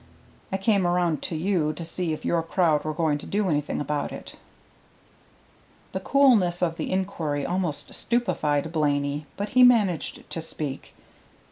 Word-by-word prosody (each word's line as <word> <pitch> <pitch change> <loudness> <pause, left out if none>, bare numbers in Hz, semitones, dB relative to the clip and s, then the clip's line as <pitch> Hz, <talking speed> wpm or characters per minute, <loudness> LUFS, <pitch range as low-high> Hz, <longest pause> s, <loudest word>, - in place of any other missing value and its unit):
I 190 - 0
came 195 -2 +2
around 175 -3 +1
to 170 - -4
you 160 -2 0
to 165 +2 -6
see 170 0 -2
if 155 - -5
your 170 - +2
crowd 165 -2 +1
were 155 - -2
going 155 -2 +1
to - - -10
do 205 0 0
anything 150 -2 -1
about 145 0 -2
it." - - -9 1.6
The - - -3
coolness 215 -11 +3
of 165 -1 0
the - - -3
inquiry 160 -6 -1
almost 175 -4 -2
stupefied 160 -10 0
Blaney, 145 -2 0
but 205 +1 -3
he 255 - +4
managed 215 -9 +3
to 165 - -5
speak. 150 -4 -6
170 Hz, 155 wpm, -25 LUFS, 150-190 Hz, 1.6 s, he